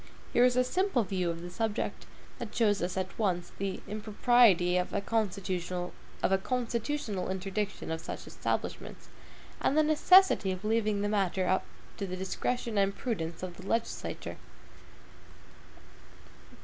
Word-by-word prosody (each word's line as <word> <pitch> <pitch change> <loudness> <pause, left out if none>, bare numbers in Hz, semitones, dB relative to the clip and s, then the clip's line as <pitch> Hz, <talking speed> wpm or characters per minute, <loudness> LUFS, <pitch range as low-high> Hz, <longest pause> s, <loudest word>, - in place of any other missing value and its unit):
Here 240 - +5
is 250 -1 +4
a 255 - +4
simple 360 - +1
view 185 -2 -1
of 170 0 -4
the 175 - -7
subject, 225 +2 -2 0.3
that 235 -3 -6
shows 210 -4 +3
us 180 +2 -2
at 190 +3 -3
once 180 -5 0
the 195 -1 -2
impropriety 210 -3 +4
of 180 0 0
a - - +1
constitutional 185 -4 -2 0.3
interdiction 205 - -1
of 160 0 -3
such - - -6
establishments, - - -4 0.5
and 285 - +2
the 310 - +6
necessity 310 - +5
of 185 +2 -5
leaving 215 -2 +1
the - - +1
matter 190 -2 +1 0.4
to 200 - -3
the 185 0 -4
discretion 220 +4 -1
and 195 0 +1
prudence 170 -9 -3
of 180 -2 -5
the 185 - -10
legislature. 230 +2 -2
200 Hz, 135 wpm, -30 LUFS, 185-230 Hz, 0.5 s, the